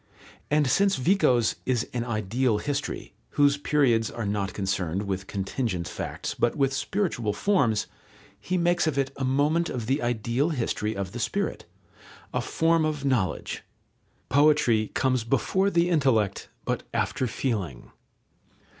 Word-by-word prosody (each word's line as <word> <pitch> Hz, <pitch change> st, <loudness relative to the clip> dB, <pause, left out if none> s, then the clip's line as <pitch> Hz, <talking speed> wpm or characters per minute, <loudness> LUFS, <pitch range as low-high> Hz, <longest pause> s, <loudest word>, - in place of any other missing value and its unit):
And 150 Hz, 0 st, +3 dB
since 195 Hz, +9 st, +3 dB
Vico's 130 Hz, -, +2 dB
is 125 Hz, -2 st, 0 dB
an 120 Hz, -1 st, -1 dB
ideal 115 Hz, +1 st, 0 dB
history, 140 Hz, +3 st, -3 dB, 0.2 s
whose 145 Hz, -1 st, +5 dB
periods 130 Hz, -7 st, +2 dB
are 115 Hz, -, -5 dB
not 100 Hz, -1 st, -1 dB
concerned 95 Hz, -2 st, -2 dB
with 95 Hz, -1 st, -3 dB
contingent 95 Hz, -2 st, -2 dB
facts, -, -, -4 dB
but 120 Hz, -, +1 dB
with 135 Hz, -2 st, +1 dB
spiritual 140 Hz, -, -1 dB
forms, 125 Hz, -, +2 dB, 0.5 s
he 185 Hz, -, -2 dB
makes 175 Hz, -1 st, +2 dB
of 150 Hz, -3 st, 0 dB
it 135 Hz, -1 st, 0 dB
a 135 Hz, -, -4 dB
moment 145 Hz, +6 st, +2 dB
of 120 Hz, -3 st, -4 dB
the 135 Hz, +5 st, 0 dB
ideal 120 Hz, +5 st, 0 dB
history 115 Hz, -6 st, -1 dB
of 95 Hz, -2 st, -3 dB
the 120 Hz, -, -6 dB
spirit, 200 Hz, -, -2 dB, 0.7 s
a -, -, 0 dB
form 165 Hz, 0 st, +2 dB
of 150 Hz, -2 st, -1 dB
knowledge. 125 Hz, -9 st, 0 dB, 0.7 s
Poetry 135 Hz, -6 st, +4 dB
comes 130 Hz, -3 st, +1 dB
before 135 Hz, -, +1 dB
the 170 Hz, -1 st, +2 dB
intellect, 120 Hz, -, +1 dB, 0.2 s
but -, -, -1 dB
after 130 Hz, -, 0 dB
feeling. 100 Hz, -, -3 dB
130 Hz, 140 wpm, -26 LUFS, 110-150 Hz, 0.7 s, whose